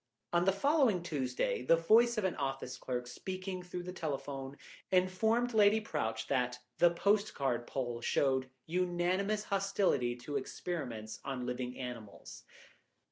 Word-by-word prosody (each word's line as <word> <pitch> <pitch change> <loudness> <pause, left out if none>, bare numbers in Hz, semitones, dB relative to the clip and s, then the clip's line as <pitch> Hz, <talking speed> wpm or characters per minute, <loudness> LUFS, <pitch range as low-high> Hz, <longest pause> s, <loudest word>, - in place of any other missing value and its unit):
On 175 0 +3
the 195 - +5
following 235 - +3
Tuesday 130 -9 -1
the 130 +7 +5
voice 225 +8 +4
of 215 - 0
an 190 - 0
office 135 -2 -3
clerk, 125 0 -3
speaking 185 +7 -5
through 180 0 -6
the 180 +1 -6
telephone, 140 -4 -4 0.3
informed 220 +6 +2
Lady 210 0 +5
Prowche 145 - -2
that 125 -2 0 0.2
the 175 - +7
postcard 170 - +1
poll 120 -3 -3
showed 130 0 +1 0.2
unanimous 180 +4 0
hostility 195 -12 +1
to 130 +4 -4
experiments 125 -7 -5
on 130 -2 -3
living 125 0 -3
animals. 120 -5 -8
165 Hz, 135 wpm, -33 LUFS, 125-190 Hz, 0.3 s, the